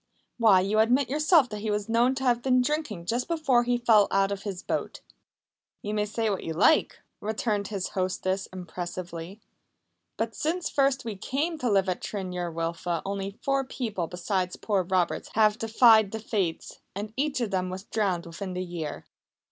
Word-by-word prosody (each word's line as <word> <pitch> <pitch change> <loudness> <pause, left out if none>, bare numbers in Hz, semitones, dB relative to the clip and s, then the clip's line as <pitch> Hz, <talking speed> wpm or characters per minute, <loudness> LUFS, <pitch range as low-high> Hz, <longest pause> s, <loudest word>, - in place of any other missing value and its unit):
"Why, 210 -5 +6
you 205 +3 +1
admit 245 +4 +3
yourself 305 -1 +4
that 210 - -5
he 215 - -2
was 210 -1 -1
known 235 +3 +3
to 265 - -4
have 240 -2 +2
been 255 0 +3
drinking 250 - -2
just 240 +6 -1
before 275 -8 +2
he 245 0 +2
fell 225 -4 +5
out 195 0 +2
of 200 -1 -3
his 195 -2 -5
boat!" - - -3 0.8
"You 210 - -3
may 210 0 +1
say 225 +1 -1
what 195 - -3
you 160 - -3
like," 200 - +3 0.2
returned 210 -1 -1
his 195 -3 -3
hostess 185 +1 -1
impressively, 175 +1 -7 0.8
"but 225 0 -2
since 335 +3 -2
first 275 -2 +2
we 220 -3 -4
came 295 - -2
to 250 - 0
live 195 -2 +3
at 185 - -2
Tryn 190 -3 -4
yr 175 -1 -3
Wylfa 165 +1 -2
only 195 0 -4
four 275 0 +1
people 220 -9 -3
besides 180 +1 -2
poor 205 -3 0
Roberts 185 -1 0
have 215 0 +4
defied 225 -2 +5
the 220 - -5
Fates, 195 -7 -3 0.2
and 210 +2 -5
each 280 0 0
of 230 -4 -1
them 185 -1 0
was 185 +1 -6
drowned 195 -5 -1
within 185 +3 -6
the 180 0 -2
year. 165 -4 -5
210 Hz, 185 wpm, -27 LUFS, 185-240 Hz, 0.8 s, Why